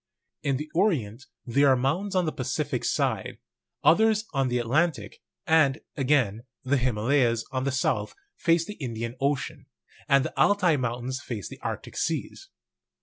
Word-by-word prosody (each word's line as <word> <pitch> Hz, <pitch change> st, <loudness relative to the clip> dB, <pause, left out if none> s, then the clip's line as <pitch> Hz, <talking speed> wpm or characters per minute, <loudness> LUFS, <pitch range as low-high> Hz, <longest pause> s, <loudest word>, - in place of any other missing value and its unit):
In 140 Hz, -2 st, 0 dB
the 150 Hz, +3 st, -5 dB
Orient 135 Hz, -, 0 dB, 0.2 s
there 140 Hz, +4 st, +3 dB
are 135 Hz, -, +6 dB
mountains 160 Hz, +11 st, -1 dB
on 180 Hz, -1 st, +2 dB
the 155 Hz, -, 0 dB
Pacific 130 Hz, 0 st, -2 dB
side, -, -, -1 dB, 0.5 s
others 215 Hz, +7 st, +4 dB
on 135 Hz, -2 st, +1 dB
the 125 Hz, 0 st, 0 dB
Atlantic; 120 Hz, -2 st, 0 dB, 0.3 s
and, 155 Hz, -4 st, +4 dB, 0.2 s
again, 130 Hz, -6 st, +1 dB, 0.2 s
the 135 Hz, +2 st, +2 dB
Himalayas, 120 Hz, 0 st, +1 dB
on 130 Hz, 0 st, -2 dB
the 140 Hz, -, +1 dB
south, 130 Hz, -, -1 dB, 0.2 s
face 165 Hz, -1 st, +2 dB
the 210 Hz, -5 st, -9 dB
Indian 115 Hz, -1 st, -4 dB
Ocean, 140 Hz, 0 st, -2 dB, 0.4 s
and 140 Hz, -1 st, +4 dB
the -, -, -4 dB
Altai 185 Hz, -5 st, +4 dB
Moun 120 Hz, -2 st, -2 dB
tains 130 Hz, +1 st, -3 dB
face 110 Hz, -8 st, -6 dB
the -, -, -11 dB
Arctic -, -, -5 dB
seas. -, -, -3 dB
135 Hz, 155 wpm, -26 LUFS, 120-160 Hz, 0.5 s, are